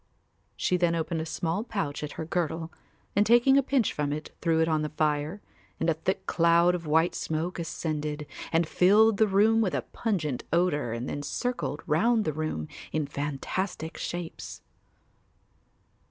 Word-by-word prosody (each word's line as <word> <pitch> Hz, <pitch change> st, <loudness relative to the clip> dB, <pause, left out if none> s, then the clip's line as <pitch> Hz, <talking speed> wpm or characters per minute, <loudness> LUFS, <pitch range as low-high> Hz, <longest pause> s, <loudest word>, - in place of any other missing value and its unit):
She 180 Hz, -, +1 dB
then 170 Hz, -1 st, +2 dB
opened 165 Hz, 0 st, -1 dB
a 160 Hz, -, -5 dB
small 165 Hz, +5 st, -2 dB
pouch 155 Hz, -12 st, -3 dB
at 150 Hz, -, -5 dB
her 160 Hz, -, -5 dB
girdle 165 Hz, 0 st, -2 dB, 0.4 s
and 205 Hz, -, +5 dB
taking 240 Hz, +5 st, +5 dB
a 275 Hz, -, +6 dB
pinch 265 Hz, -4 st, +1 dB
from 145 Hz, -1 st, -1 dB
it 150 Hz, +1 st, -5 dB
threw 165 Hz, -1 st, +2 dB
it 160 Hz, -, +3 dB
on 155 Hz, -2 st, +1 dB
the 150 Hz, -, -2 dB
fire 150 Hz, +4 st, -1 dB, 0.4 s
and 165 Hz, -, +2 dB
a -, -, +2 dB
thick 160 Hz, +4 st, -2 dB
cloud 170 Hz, +1 st, +4 dB
of 170 Hz, -3 st, -4 dB
white 160 Hz, +3 st, +3 dB
smoke 165 Hz, +3 st, -3 dB
ascended 155 Hz, -2 st, -3 dB, 0.3 s
and 165 Hz, 0 st, +2 dB
filled 210 Hz, +5 st, +5 dB
the 220 Hz, -, +4 dB
room 215 Hz, +3 st, +4 dB
with 195 Hz, -5 st, 0 dB
a -, -, -1 dB
pungent 155 Hz, -, -1 dB
odour 155 Hz, -8 st, +1 dB
and 115 Hz, +3 st, -4 dB
then 145 Hz, -, -3 dB
circled 240 Hz, -, -3 dB
round 215 Hz, +9 st, +2 dB
the 155 Hz, -, 0 dB
room 155 Hz, -, -3 dB, 0.2 s
in 155 Hz, -2 st, 0 dB
fantastic 150 Hz, +5 st, -3 dB
shapes. 175 Hz, -1 st, -6 dB
165 Hz, 170 wpm, -28 LUFS, 155-190 Hz, 0.4 s, a